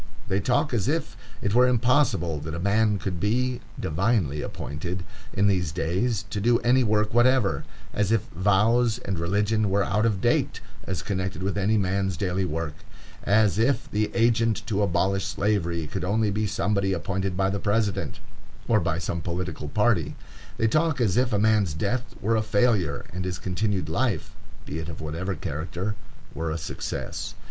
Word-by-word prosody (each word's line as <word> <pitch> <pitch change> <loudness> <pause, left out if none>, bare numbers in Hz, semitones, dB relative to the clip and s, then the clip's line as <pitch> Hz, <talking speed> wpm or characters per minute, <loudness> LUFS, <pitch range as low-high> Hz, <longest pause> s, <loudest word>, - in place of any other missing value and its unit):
They 95 - +2
talk 125 +6 +1
as 115 -2 0
if 155 +1 -1 0.3
it 100 - 0
were 125 +2 +6
impossible 120 - +2
that 80 +2 -5
a - - -4
man 105 +3 +2
could 95 -3 -4
be 125 +5 0 0.2
"divinely 85 - 0
appointed" 85 +5 -5 0.3
in 100 - +1
these 90 -6 +2
days 95 +6 -1
to 105 - -2
do 120 +3 +4
any 125 +2 +4
work 105 -1 +1
whatever; 120 -2 +3 0.3
as 105 0 +1
if 115 - +3
vows 105 +5 +3
and 95 -4 -4
religion 105 +4 +1
were 100 +1 +2
out 110 +3 +1
of 105 -4 0
date - - +1 0.3
as 95 -1 -3
connected 95 -2 -3
with 100 +1 -1
any 100 +2 +2
man's 95 -2 0
daily 95 +1 0
work; 80 -2 -3 0.5
as 105 -2 +3
if 130 +5 +1
the 105 0 +1
agent 115 -1 +2
to 105 -2 0
abolish 95 +1 +1
Slavery 85 -6 0
could 75 - -4
only 105 +3 +1
be 105 +1 0
somebody 100 -1 0
appointed 95 +1 -2
by 95 0 +2
the 100 - -2
President, 105 -1 0 0.5
or - - +4
by - - 0
some 85 - -3
political 85 -3 -4
party. 105 -3 +1 0.4
They 115 - +2
talk 155 +3 +2
as 105 -7 +2
if 125 0 +2
a 105 - +2
man's 105 -6 +2
death 120 +9 -2
were 115 +3 +1
a 110 - +2
failure, 100 - +1
and 90 +1 -3
his 90 -1 -3
continued 95 -2 -1
life, 100 - -1 0.3
be 75 - -4
it 80 +1 -5
of 80 - -7
whatever 85 +5 -3
character, 85 +7 -3 0.4
were 80 0 -3
a 80 - -2
success. 80 - -5
100 Hz, 175 wpm, -26 LUFS, 90-110 Hz, 0.5 s, were